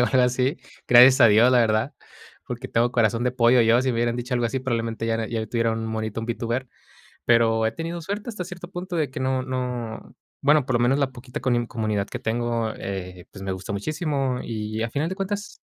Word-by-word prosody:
qué, - - +5
o 125 - +4
algo 130 -1 +3
así. 125 +4 +1 0.3
Gracias 125 +3 +8
a 120 - +9
Dios, 115 +5 +5
la 125 - +5
verdad, 110 +3 +2 0.5
porque - - -5
tengo 120 +1 +1
corazón 115 0 +2
de 125 - +2
pollo 120 0 +4
yo. 115 +2 +4
Si 130 - 0
me 115 - -2
hubieran 120 0 0
dicho 125 +1 -5
algo 120 -1 +1
así, 130 +3 -2
probablemente 115 -3 -2
ya 115 - 0
era 115 0 -2
ya 115 -2 -2
tuviera 115 0 0
un 115 0 -3
monito, 110 0 -3
un 115 - -5
Vtuber. 120 +2 -2 0.6
Pero 115 -1 +3
he 110 - -1
tenido 165 +3 -5
suerte 200 +7 -5
hasta 205 -6 -4
cierto 175 -1 -9
punto, 180 0 -6
de 155 -5 0
que - - -6
no 130 0 0
no 125 -3 -4 0.3
bueno, 145 0 +4
por 130 -1 -2
lo - - +3
menos 130 +4 +3
la 135 -2 +1
poquita 125 0 -8
coni 120 -2 +1
comunidad 110 -4 -2
que - - -6
tengo, 115 -1 -1
eh, 90 -2 -6
pues, 95 - -10
me 95 - -3
gusta 95 +2 -5
muchísimo. 140 - -1
Y 110 -1 -4
a 115 - -4
final 150 +5 -1
de 190 - -5
cuentas 205 +1 -4
120 Hz, 235 wpm, -24 LUFS, 115-130 Hz, 0.6 s, a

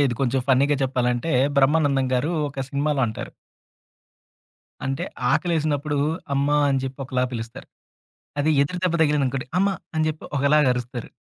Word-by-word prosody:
నార్మల్‌గా - - +5
ఇది 120 - -2
కొంచెం 135 0 +1
ఫన్నీగా 140 +2 +4
చెప్పాలంటే, 125 +2 0 0.3
బ్రహ్మానందం 140 -1 +3
గారు 130 +6 0 0.2
ఒక 135 -1 -5
సినిమాలో 145 0 0
అంటారు. 110 - -6 1.6
అంటే, 135 0 -2 0.3
ఆకలేసినప్పుడు 150 -4 0 0.4
అమ్మా! 145 +2 +2
అని 135 - +2
చెప్పి 135 +1 -6
ఒకలా 130 -1 0
పిలుస్తారు. 115 -1 -7 0.7
అదే 150 +2 +2
ఎదురు 180 +6 -3
దెబ్బ 175 -2 +1
తగిలిందనుకోండి, 140 -4 0
అమ్మ! 200 - +3 0.3
అని 155 0 +2
చెప్పి 155 0 -5
ఒకలాగ 150 +2 +4
అరుస్తరు. 125 -1 -6
140 Hz, 140 wpm, -23 LUFS, 130-150 Hz, 1.6 s, నార్మల్‌గా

